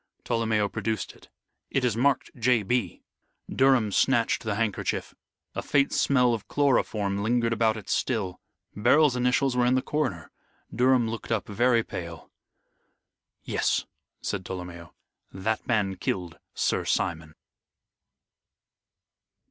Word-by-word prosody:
Tolomeo 110 Hz, -3 st, +1 dB
produced 110 Hz, 0 st, -3 dB
it. -, -, -20 dB, 0.4 s
"It 135 Hz, -2 st, 0 dB
is 120 Hz, -4 st, +1 dB
marked 135 Hz, +3 st, +1 dB
'J. 120 Hz, -2 st, +2 dB
B.'" 105 Hz, -3 st, -1 dB, 0.4 s
Durham 130 Hz, -5 st, +3 dB
snatched 120 Hz, +2 st, +2 dB
the 110 Hz, -3 st, -2 dB
handkerchief. 105 Hz, -2 st, -2 dB, 0.4 s
A -, -, -3 dB
faint 140 Hz, -1 st, +1 dB
smell 125 Hz, -3 st, +3 dB
of 110 Hz, -3 st, -5 dB
chloroform 105 Hz, -8 st, +1 dB
lingered 115 Hz, +1 st, +1 dB
about 110 Hz, -1 st, +1 dB
it 105 Hz, -3 st, -10 dB
still. 100 Hz, -7 st, -1 dB, 0.4 s
Beryl's 130 Hz, +6 st, +4 dB
initials 125 Hz, +1 st, +1 dB
were 125 Hz, 0 st, +3 dB
in 125 Hz, -, +3 dB
the 130 Hz, -, +2 dB
corner. 120 Hz, -, -2 dB, 0.4 s
Durham 125 Hz, -1 st, +3 dB
looked 115 Hz, +1 st, -6 dB
up 110 Hz, -5 st, -1 dB
very 120 Hz, +2 st, +2 dB
pale. 85 Hz, -4 st, -8 dB, 1.1 s
"Yes," -, -, 0 dB, 0.4 s
said 100 Hz, -2 st, -3 dB
Tolomeo, 90 Hz, -2 st, -7 dB, 0.4 s
"that 110 Hz, +4 st, -3 dB
man 105 Hz, -5 st, +1 dB
killed 90 Hz, -2 st, -3 dB, 0.2 s
Sir -, -, 0 dB
Simon." 80 Hz, -2 st, -2 dB
115 Hz, 125 wpm, -26 LUFS, 100-125 Hz, 1.1 s, Beryl's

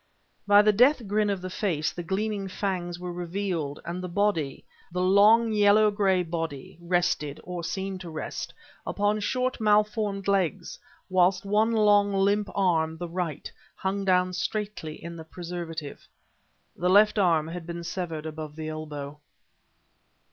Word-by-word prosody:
By 205 Hz, 0 st, +7 dB
the 210 Hz, 0 st, +4 dB
death 250 Hz, +3 st, +4 dB
grin 210 Hz, +1 st, +1 dB
of 195 Hz, -2 st, -2 dB
the 185 Hz, -, -4 dB
face 170 Hz, -7 st, -1 dB
the 175 Hz, -, -5 dB
gleaming 195 Hz, +3 st, -2 dB
fangs 185 Hz, -3 st, -3 dB
were 180 Hz, 0 st, -5 dB
revealed; 175 Hz, -4 st, -3 dB
and 175 Hz, +2 st, -4 dB
the 180 Hz, -, -5 dB
body, 170 Hz, -7 st, -1 dB, 0.3 s
the 180 Hz, -, -3 dB
long 210 Hz, +5 st, +5 dB
yellow 210 Hz, 0 st, +5 dB
gray 195 Hz, -3 st, +2 dB
body, 165 Hz, -5 st, -5 dB
rested, 175 Hz, -4 st, 0 dB
or 180 Hz, -1 st, -5 dB
seemed 190 Hz, +2 st, -4 dB
to 175 Hz, -, -7 dB
rest, 155 Hz, -1 st, -5 dB, 0.4 s
upon 205 Hz, +1 st, 0 dB
short, 255 Hz, +3 st, -1 dB
malformed 210 Hz, -2 st, +1 dB
legs, 195 Hz, -2 st, 0 dB, 0.3 s
whilst 185 Hz, +1 st, +2 dB
one 210 Hz, +3 st, +2 dB
long 205 Hz, -2 st, +4 dB
limp 200 Hz, +2 st, +2 dB
arm, 160 Hz, -4 st, +1 dB
the 175 Hz, +1 st, -5 dB
right, 170 Hz, -3 st, -4 dB, 0.2 s
hung 195 Hz, +1 st, -2 dB
down 185 Hz, -1 st, +2 dB
straightly 200 Hz, -4 st, -3 dB
in 170 Hz, 0 st, -7 dB
the 160 Hz, -, -8 dB
preservative. 165 Hz, -3 st, -7 dB, 0.7 s
The 180 Hz, +1 st, 0 dB
left 210 Hz, +2 st, +5 dB
arm 165 Hz, -5 st, +2 dB
had 170 Hz, 0 st, -7 dB
been 170 Hz, 0 st, -5 dB
severed 165 Hz, -3 st, -4 dB
above 155 Hz, -1 st, -6 dB
the 155 Hz, 0 st, -5 dB
elbow. 150 Hz, -2 st, -6 dB
185 Hz, 150 wpm, -27 LUFS, 165-205 Hz, 0.7 s, By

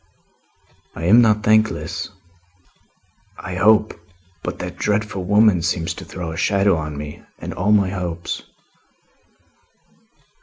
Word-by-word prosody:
"I -, -, -6 dB
am 110 Hz, +8 st, +6 dB
not 105 Hz, -2 st, +3 dB
thankless, 110 Hz, 0 st, +1 dB, 1.3 s
I 95 Hz, -, -7 dB
hope, 105 Hz, +3 st, +3 dB, 0.5 s
but -, -, -5 dB
that 90 Hz, 0 st, -6 dB
dreadful 105 Hz, -2 st, -1 dB
woman 105 Hz, -2 st, +4 dB
seems 85 Hz, -1 st, -1 dB
to -, -, -10 dB
throw 85 Hz, -2 st, -6 dB
a 80 Hz, -, -7 dB
shadow 100 Hz, 0 st, +2 dB
on 75 Hz, -2 st, -4 dB
me 75 Hz, 0 st, -7 dB, 0.2 s
and -, -, -6 dB
on -, -, -10 dB
all 105 Hz, -, +3 dB
my 100 Hz, -3 st, +4 dB
hopes." 85 Hz, -3 st, -4 dB
95 Hz, 125 wpm, -20 LUFS, 85-105 Hz, 1.3 s, am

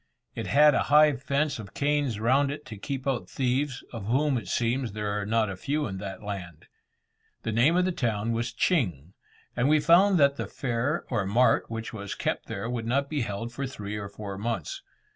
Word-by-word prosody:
It -, -, -5 dB
had 150 Hz, +1 st, +6 dB
a -, -, +2 dB
high 150 Hz, 0 st, +7 dB
fence 140 Hz, +1 st, -1 dB
of 100 Hz, -3 st, -10 dB
canes 145 Hz, -6 st, 0 dB
round 135 Hz, +5 st, +3 dB
it 145 Hz, +1 st, -6 dB
to 110 Hz, -, -8 dB
keep 135 Hz, +6 st, -5 dB
out 135 Hz, -4 st, -1 dB
thieves, 135 Hz, +1 st, -1 dB
of 110 Hz, -4 st, -6 dB
whom, 140 Hz, +4 st, +2 dB
it 105 Hz, -, -11 dB
seems, 120 Hz, +3 st, 0 dB
there 105 Hz, -1 st, -2 dB
are 100 Hz, -, -5 dB
not 110 Hz, 0 st, +2 dB
a 95 Hz, -, -4 dB
few 145 Hz, +10 st, -1 dB
in 95 Hz, -3 st, -5 dB
that 100 Hz, +1 st, -7 dB
land. 95 Hz, -6 st, -6 dB, 0.8 s
The 110 Hz, -, -2 dB
name 125 Hz, +10 st, +4 dB
of 180 Hz, -, +3 dB
the 185 Hz, -, +1 dB
town 115 Hz, -, -1 dB
was 115 Hz, +1 st, -1 dB
Ching, 90 Hz, -, 0 dB, 0.4 s
and 125 Hz, +3 st, +2 dB
we 155 Hz, 0 st, +5 dB
found 180 Hz, +5 st, +5 dB
that 140 Hz, -1 st, +4 dB
the -, -, -3 dB
fair 130 Hz, +5 st, -2 dB
or 100 Hz, -2 st, 0 dB
mart 120 Hz, +6 st, +3 dB
which 115 Hz, 0 st, -5 dB
was 100 Hz, -2 st, -5 dB
kept -, -, -2 dB
there 100 Hz, +3 st, -4 dB
would 120 Hz, -2 st, -3 dB
not 140 Hz, +4 st, 0 dB
be 150 Hz, -3 st, 0 dB
held 115 Hz, +2 st, -4 dB
for 135 Hz, +2 st, -3 dB
three 105 Hz, -5 st, -6 dB
or 100 Hz, -1 st, -5 dB
four 100 Hz, -1 st, -7 dB
months. 105 Hz, -8 st, -3 dB
120 Hz, 210 wpm, -27 LUFS, 105-140 Hz, 0.8 s, high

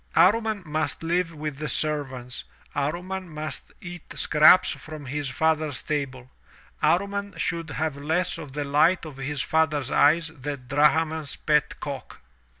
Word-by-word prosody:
Amman 215 Hz, 0 st, +4 dB
must 155 Hz, +1 st, -2 dB
live 170 Hz, +1 st, +1 dB
with 150 Hz, -3 st, -5 dB
the 150 Hz, -, -3 dB
servants, 135 Hz, -5 st, -1 dB, 0.3 s
Amman 175 Hz, +6 st, -3 dB
must 155 Hz, -2 st, -6 dB
eat 175 Hz, -1 st, -8 dB, 0.2 s
scraps 155 Hz, +4 st, +6 dB
from 155 Hz, -2 st, -8 dB
his 140 Hz, +1 st, -3 dB
father's 155 Hz, -2 st, 0 dB
table, 130 Hz, -4 st, -3 dB, 0.5 s
Amman 200 Hz, +1 st, +1 dB
should 165 Hz, -1 st, -2 dB
have 155 Hz, 0 st, -2 dB
less 160 Hz, +5 st, 0 dB
of 145 Hz, -5 st, -9 dB
the 145 Hz, 0 st, -2 dB
light 150 Hz, +6 st, +3 dB
of 150 Hz, -4 st, -9 dB
his 140 Hz, 0 st, -2 dB
father's 150 Hz, -4 st, +1 dB
eyes 165 Hz, +3 st, +4 dB
than 140 Hz, -2 st, -6 dB
Drahman's 155 Hz, +2 st, +2 dB
pet 150 Hz, -1 st, +1 dB
cock! 140 Hz, -2 st, -7 dB
155 Hz, 140 wpm, -25 LUFS, 145-165 Hz, 0.5 s, scraps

